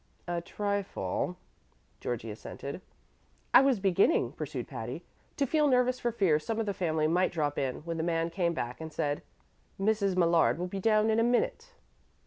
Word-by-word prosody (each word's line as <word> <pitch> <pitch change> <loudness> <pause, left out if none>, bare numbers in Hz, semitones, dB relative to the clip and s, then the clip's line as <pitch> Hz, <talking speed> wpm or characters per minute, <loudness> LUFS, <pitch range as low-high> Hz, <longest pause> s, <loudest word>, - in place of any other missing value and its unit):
"A 175 -1 -1
trifle," 190 - -2 0.6
Georgie 115 -2 -4
assented. 140 - -7 0.7
"I - - +10
was 270 -5 +3
beginning," 195 - +3
pursued - - -5
Patty, - - -6 0.3
"to 280 - +2
feel 300 +2 +2
nervous 255 -1 +3
for 240 - 0
fear 190 -9 +2
some 220 +9 -3
of 225 - 0
the 200 - -1
family 160 -5 0
might 180 +3 +2
drop 150 -4 -1
in, 130 -2 -2
when 165 +1 -4
the 160 - -1
man 165 0 0
came 170 -2 0
back 125 0 -4
and 160 0 -6
said, 145 -1 -1 0.6
'Mrs. 200 -2 +1
Millard 170 -3 +4
will 175 - -2
be 195 +2 -4
down 215 +1 +3
in 220 - +2
a - - +4
minute.' 455 - 0
180 Hz, 175 wpm, -30 LUFS, 160-220 Hz, 0.7 s, I